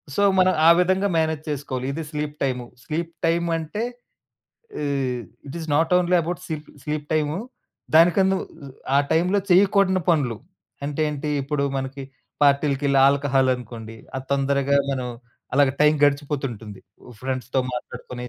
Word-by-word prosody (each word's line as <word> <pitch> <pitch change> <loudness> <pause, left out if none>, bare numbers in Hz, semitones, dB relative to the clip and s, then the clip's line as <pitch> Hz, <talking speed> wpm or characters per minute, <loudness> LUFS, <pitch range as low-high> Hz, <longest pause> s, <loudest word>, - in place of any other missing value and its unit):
So, - - +1 0.2
మనం 185 0 +4
ఆ - - +9
విధంగా 185 +2 +2
మేనేజ్ 160 -1 0
చేసుకోవాలి. 130 -3 -3
ఇది 160 +2 -4
స్లీప్ 150 -1 -3
టైము. 125 -2 -1 0.2
స్లీప్ 165 +1 -3
టైమ్ 170 +1 +1
అంటే 165 +8 -4 1.0
ఆహ్, 135 -4 -1 0.3
it 140 - -7
is 160 - -7
not 160 +3 +2
only 180 0 +2
about 175 +2 -4
స్లీప 155 -2 -5 0.2
sleep 150 -1 -3
time 155 +2 0 0.6
దానికన్నా 190 +3 +5 0.6
ఆ - - +6 0.2
టైంలో 180 +5 +2
చేయకూడని 190 0 +4
పనులు 130 -9 +1 0.5
అంటే 145 +1 -3
ఏంటి? 150 +1 -4
ఇప్పుడు 140 0 -1
మనకి 135 +1 -5 0.4
పార్టీలకెళ్ళి 140 -1 +3
ఆల్కహాల్ 140 -2 +2
అనుకోండి. 115 -2 -9 0.2
అది 130 0 -6
తొందరగా 140 0 +1 0.2
మనం 130 -2 -3 0.5
అలాగే 140 -1 +4
టైం 150 +1 +5
గడిచిపోతుంటుంది. 135 -8 -2 0.4
ఫ్రెండ్స్‌తో 130 0 -1
మాట్లాడుకుని 125 0 -6
145 Hz, 135 wpm, -23 LUFS, 135-165 Hz, 1.0 s, ఆ